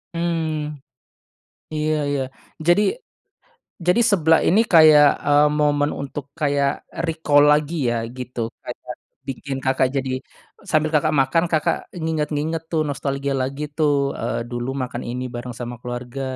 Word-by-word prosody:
Hmm. 160 -3 -2 1.0
Iya 155 0 0 0.2
iya. 140 -1 0 0.5
Jadi 175 +4 +5 1.0
jadi 180 +6 +4
seblak 165 -4 +4
ini 205 +6 +5
kayak, 155 -3 +8 0.2
eee, 145 +1 +5
momen 145 0 +2
untuk 140 0 -5 0.2
kayak 140 -2 +2 0.4
recall 155 -3 +3
lagi 150 +2 +1 0.2
ya 120 - 0 0.2
gitu, 125 -1 -8 0.2
kayak 125 0 -7 0.3
bikin 135 0 -4
Kakak 130 0 +2
jadi 135 -1 -1 0.6
sambil 155 0 +2
Kakak 155 0 +2
makan, 135 +6 +2
Kakak 155 - +2 0.3
nginget-nginget 160 0 -1
tuh 160 -2 +1
nostalgia 140 0 -2
lagi 135 +3 -4
tuh, 155 -2 +3 0.3
eee, - - -2
dulu 120 +1 -3
makan 125 -1 -5
ini 125 +1 -4
bareng 120 0 -6
sama 120 0 -5
keluarga 125 +2 -6
145 Hz, 130 wpm, -22 LUFS, 130-155 Hz, 1.0 s, kayak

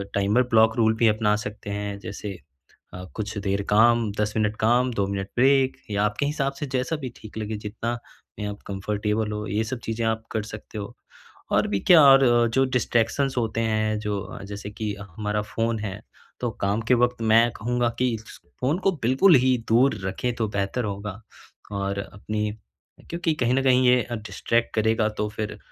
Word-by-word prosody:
Timer 100 +5 +3
block 110 0 +5
rule 110 -1 +4
भी 115 - +4
अपना 105 -1 +2
सकते 105 -1 -7
हैं। 100 0 -3
जैसे 100 -2 -6 0.6
अ, 90 - -7
कुछ 110 -1 -4
देर 100 0 -1
काम 115 0 +4
10 105 0 0
मिनट 105 0 +1
काम, 125 +3 +3
2 100 -3 0
मिनट 100 -1 -3
ब्रेक 135 +1 +4
या 100 0 +1
आपके 105 +7 -1
हिसाब 140 -2 -1
से 140 +2 -5
जैसा 130 +5 0
भी 130 - -3
ठीक 110 0 -11
लगे, 110 0 -3
जितना 110 +3 -4 0.4
में 105 - -3
आप 105 0 -6
कंफर्टेबल 105 +2 -2
हो, 105 0 -4
ये 105 +3 0
सब 120 +3 -4
चीज़ें 115 0 -2
आप 110 0 -1
कर 110 - -1
सकते 105 0 -9
हो। 100 -1 -6 0.6
और - - +3
भी 100 -1 0
क्या 175 -3 +9
और 135 0 +8 0.3
जो 135 0 +4
डिस्ट्रैक्शंस 130 +1 0
होते 115 -1 0
हैं 110 -1 0
जो 105 -3 -4
जैसे 105 0 -6
कि 105 0 -3
हमारा 105 +2 -3
फ़ोन 115 +1 -2
है 105 -1 -5 0.4
तो 120 - 0
काम 100 +3 +1
के - - +6
वक्त 125 0 +1
मैं 115 +2 +6
कहूँगा 120 +2 0
कि 125 -2 +2 0.5
फ़ोन 140 +6 +1
को 195 - +5
बिल्कुल 135 +9 +5
ही 130 -1 +3
दूर 120 +2 +4
रखें 115 +6 -2
तो 110 -2 -1
बेहतर 100 +4 -2
होगा 100 0 -5 0.6
और 100 0 -2
अपनी 105 +2 -3 0.6
क्योंकि 170 -1 0
कहीं 120 0 +3
न 135 - +1
कहीं 130 -1 +4
ये 125 0 +4
डिस्ट्रैक्ट 115 +1 -1
करेगा 110 0 +2
तो 105 - +1
फिर 105 0 -5
110 Hz, 185 wpm, -25 LUFS, 105-120 Hz, 0.6 s, क्या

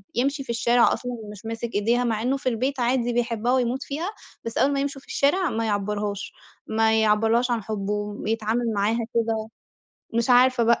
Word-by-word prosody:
يمشي 275 +3 0
في - - -21
الشارع 235 +1 +3
أصلًا 245 - -4 0.2
مش 210 +2 -12
ماسك 230 +1 -4
إيديها 235 +4 +2
مع 225 -3 0
إنه 260 +4 +1
في 260 - -1
البيت 255 +3 -1
عادي 240 0 +1
بيحبها 240 0 0
ويموت 255 +1 0
فيها، 320 +7 -3 0.4
بس 230 - -4
أول 275 - +3
ما 275 - 0
يمشوا 275 -1 -3
في - - -23
الشارع 340 +5 +2
ما 225 0 -1
يعبرهاش، 205 -1 -2 0.3
ما 220 0 +2
يعَبَّرلَهاش 225 +3 +3
عن 230 -3 -1
حُبُّه 205 -1 -3
ويتعامل 220 +2 -1
معاها 210 +3 +1 0.2
كده. 225 -1 0 0.7
مش 235 +2 +1
عارفة 250 -1 +5
بقى 235 0 +3
235 Hz, 185 wpm, -24 LUFS, 220-250 Hz, 0.7 s, عارفة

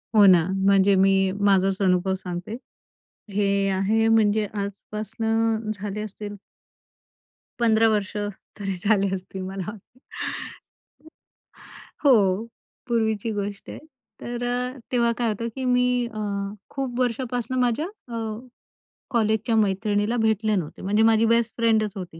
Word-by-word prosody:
हो 210 -2 +8
ना. 180 -4 +6 0.2
म्हणजे 195 0 +5
मी 195 0 +3
माझाच 195 -1 +3
अनुभव 185 0 +2
सांगते. 185 +3 -5 0.8
हे 200 0 +1
आहे 200 +4 +2
म्हणजे 215 -1 +3
आजपासनं 215 +2 -2
झाले 205 0 -5
असतील 205 0 -7 1.2
15 225 -1 +4
वर्ष 210 -2 -1 0.4
तरी 195 -2 -3
झाले 200 -2 +2
असतील 190 0 -7
मला. 190 +1 -5 2.3
हो, 215 -6 +4 0.4
पूर्वीची 220 -2 0
गोष्ट 205 -1 -5
आहे. - - -7 0.4
तर 240 0 -4
अ, 250 +2 -2
तेव्हा 235 -2 +2
काय 240 - 0
होतं, 220 +2 -3
की 265 - -3
मी 250 -1 +2
अ, 215 - -5 0.5
खूप 260 -3 -4
वर्षापासनं 245 0 -1
माझ्या 245 +4 +1 0.3
अ, - - -2 0.9
कॉलेजच्या 220 -1 +1
मैत्रिणीला 205 +2 +1
भेटले 220 -1 +1
नव्हते, 170 -6 -4
म्हणजे 210 +3 +2
माझी 225 0 +4
बेस्ट 230 0 +2
फ्रेंडच 220 -2 +2
होती. 180 -4 -8
215 Hz, 120 wpm, -24 LUFS, 195-230 Hz, 2.3 s, हो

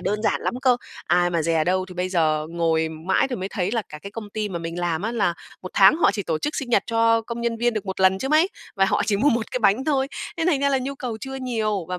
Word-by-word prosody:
đơn 210 +1 -2
giản - - +1
lắm - - -2
cơ, 255 -2 +4 0.3
ai 175 +1 +3
mà 170 -2 0
dè 160 0 +1
đâu 185 +2 +1
thì 180 - -10
bây 180 +1 -2
giờ 155 -4 +1
ngồi 165 -1 +1
mãi 165 +10 0
thì 250 - -3
mới 190 0 -4
thấy 195 -2 -2
là 230 -2 0
cả 150 - -9
cái 200 - -7
công 210 0 -8
ty 215 0 -3
mà 180 -3 -4
mình 165 +1 -5
làm 175 0 -1
á 225 +2 -2
là 200 -7 +1 0.3
một 185 - -6
tháng 195 +9 +7
họ 340 - +4
chỉ 205 - -3
tổ 160 -4 -2
chức 295 - -3
sinh 260 -3 -4
nhật 205 - +4
cho 230 0 +3
công 235 +1 -6
nhân 235 -1 -1
viên 240 0 +1
được 215 -1 -4
1 190 0 -4
lần 190 0 +4
chứ 265 - -3
mấy, 310 +4 +4 0.3
và 195 - +4
họ - - +1
chỉ 210 - +2
mua 275 +9 +3
1 230 -3 0
cái - - -1
bánh 225 +2 +2
thôi. 275 -3 +1 0.3
Nên 330 0 0
thành 300 -6 +2
ra 280 - +3
là 270 -1 +2
nhu 270 +2 -4
cầu 250 -4 -5
chưa 270 0 -6
nhiều 220 -8 -2
và 180 0 -3
205 Hz, 300 wpm, -23 LUFS, 175-240 Hz, 0.3 s, tháng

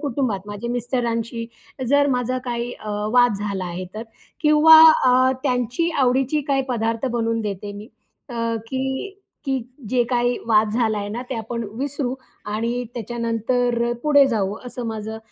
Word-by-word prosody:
कुटुंबात 240 -9 -2
माझ्या 205 +3 -5
मिस्टरांशी 235 -1 -2 0.4
जर 285 +1 +4
माझा 250 +1 -1
काही 240 -1 -3
अ, 215 - -6 0.2
वाद 245 -3 +5
झाला 200 -2 -3
आहे. 175 +1 -5
तर 215 - -5 0.4
किंवा 310 +1 +8 0.2
अ, 255 +1 +5
त्यांची 250 +5 0
आवडीची 265 +3 +2
काही 270 -1 +2
पदार्थ 230 +1 -1
बनवून 230 0 0
देते 205 0 -4
मी. 205 +2 -10 0.4
अ, 245 - -8 0.3
की 265 +9 -3 0.3
की 270 -1 +1 0.3
जे 250 +2 +2
काही 245 0 +1
वाद 215 -1 +3
झालाय 220 -4 0
ना, 220 +4 -4
ते - - -1
आपण 230 +1 -4
विसरू 275 -2 -2 0.4
आणि 235 +3 -1
त्याच्यानंतर 235 +1 -1
अ, - - +1
पुढे 285 -2 +6
जाऊ 210 -4 -1
असं 245 -1 -6
माझा 220 0 -5
240 Hz, 150 wpm, -22 LUFS, 220-260 Hz, 0.4 s, किंवा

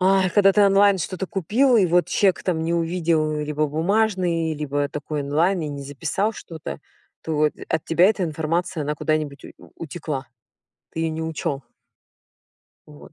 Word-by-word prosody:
а, 190 0 +4
и - - +1
когда 195 0 +5
ты 210 - +3
онлайн 200 0 +5
что-то 185 +2 -3
купил, 230 - +2
и 195 -5 +4
вот 175 +1 +3
чек 195 -3 +2
там 165 -3 -1
не 170 +1 0
увидел, 165 -2 0
либо 150 0 -1
бумажный, 170 0 0
либо 145 -1 -2
такой 150 0 -4
онлайн, 165 +6 +1
и 150 - -3
не 140 -1 -6
записал 160 +10 -2
что-то, 165 -6 -8 0.4
то 155 -1 +1 0.2
от 160 - -1
тебя 170 +3 +4
эта 200 -3 +1
информация, 160 +1 -2
она 150 +1 -2
куда-нибудь 155 -2 -2
ут - - -11 0.2
утекла. 150 -4 -5 0.6
Ты 160 - -5
её 165 -1 0
не 160 +1 -4
учёл. 160 -3 -3 1.3
Вот, 75 0 -15
165 Hz, 165 wpm, -23 LUFS, 150-185 Hz, 1.3 s, когда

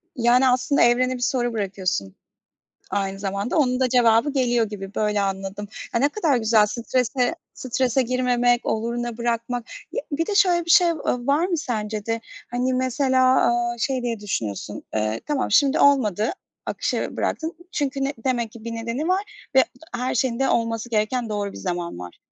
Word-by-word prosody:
Yani, 245 +2 +4
aslında, 250 +3 +2
evrene 250 +2 +4
bir - - -7
soru 245 -1 0
bırakıyorsun. 190 - -2 0.8
Aynı 195 -1 -2
zamanda 200 - -2
onun 255 -4 +2
da 260 -1 +2
cevabı 240 +2 +4
geliyor 245 -4 +2
gibi, 195 -1 -8
böyle 210 -1 +1
anladım. 195 +1 -3 0.3
A, 235 - +2
ne 280 +4 +3
kadar 300 -7 +1
güzel 220 -2 +4
strese 245 +3 0 0.2
strese 255 +1 0
girmemek, 245 -1 +1
oluruna 235 +1 -2
bırakmak. 235 0 -2 0.3
Ya, - - -2
bir 315 +3 0
de 415 - -1
şöyle 360 -4 +4
bir - - -8
şey, 355 0 +7
v - - +3 0.2
ııı, 245 0 -2
var 295 +5 +3
mı 360 -2 -1
sence 215 -8 -3
de? 225 0 -2 0.3
Hani, 250 +1 0
mesela, 255 -1 +3
eee, 240 0 -1
şey 255 +1 -1
diye 235 -2 -2
düşünüyorsun? 110 - -4
Eee, 110 +1 -1
tamam, 290 -6 -1
şimdi 280 +7 +4
olmadı. 225 -7 +3 0.3
Akışa - - -2
bıraktın. 320 +1 -2 0.2
Çünkü 275 -1 -1
ne 275 +1 -1
demek 240 -4 0
ki 225 -1 -13
bir 230 - -5
nedeni 230 +7 -3
var 400 +3 -2
ve 265 - +7 0.3
her 250 +1 -2
şeyin 245 -1 0
de 270 - +2
olması 230 0 0
gereken 225 +2 0
doğru 205 -1 -2
bir - - -10
zaman 175 - -4
var. 90 -1 -9
240 Hz, 175 wpm, -23 LUFS, 215-260 Hz, 0.8 s, şey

